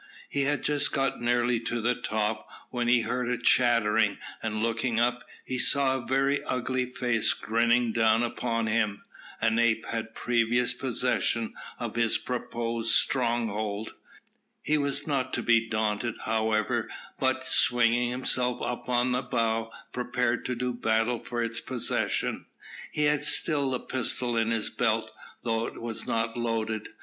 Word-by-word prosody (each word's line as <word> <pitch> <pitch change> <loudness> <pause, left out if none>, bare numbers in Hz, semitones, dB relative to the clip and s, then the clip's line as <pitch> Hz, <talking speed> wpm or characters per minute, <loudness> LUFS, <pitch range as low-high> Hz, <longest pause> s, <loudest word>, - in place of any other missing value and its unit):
He 140 -1 0
had 145 +1 -1 0.3
got 135 -2 0
nearly 120 0 +2
to 120 +1 -3
the 120 +2 +1
top, 110 -2 -2 0.2
when 120 -1 -1
he 120 0 +4
heard 125 +1 -2
a 125 - 0
chattering, 115 -3 +3 0.2
and 110 -1 -2
looking 115 0 0
up, 120 +1 +1 0.2
he 130 -1 -3
saw 135 0 +3
a 120 - -10
very 135 +2 +1
ugly 125 0 -1
face 120 -3 +1
grinning 115 +1 +1
down 115 0 +3
upon 115 -1 -1
him. 110 -2 0 0.4
An 115 +1 +2
ape 115 -1 +2
had 115 0 -5
previous 120 +1 +2
possession 125 -2 0 0.2
of 120 -2 -5
his 115 -1 +4
proposed 115 -2 -2
stronghold. 110 -4 +1 0.7
He 155 - +1
was 140 -1 0
not 140 -4 -1
to - - -2
be 115 -1 +3
daunted, 110 +1 -1
however, 110 -1 0 0.3
but, 130 0 +1
swinging 120 -1 +3
himself 125 0 0
up 125 +1 -4
on 125 0 +2
the 125 +1 +1
bough, 115 -3 -1 0.2
prepared 125 -1 -1
to 125 - -1
do 125 +1 -2
battle 115 0 +1
for 120 -1 -3
its 115 0 -1
possession. 130 -2 -2 0.4
He 150 - 0
had 150 0 +2
still 140 -3 +2
a - - -2
pistol 125 -1 0
in 115 0 +1
his 115 -2 0
belt, - - 0 0.3
though 115 -1 0
it - - -9
was 115 -1 -5
not 115 0 -1
loaded. 110 -2 -2
120 Hz, 150 wpm, -27 LUFS, 115-125 Hz, 0.7 s, he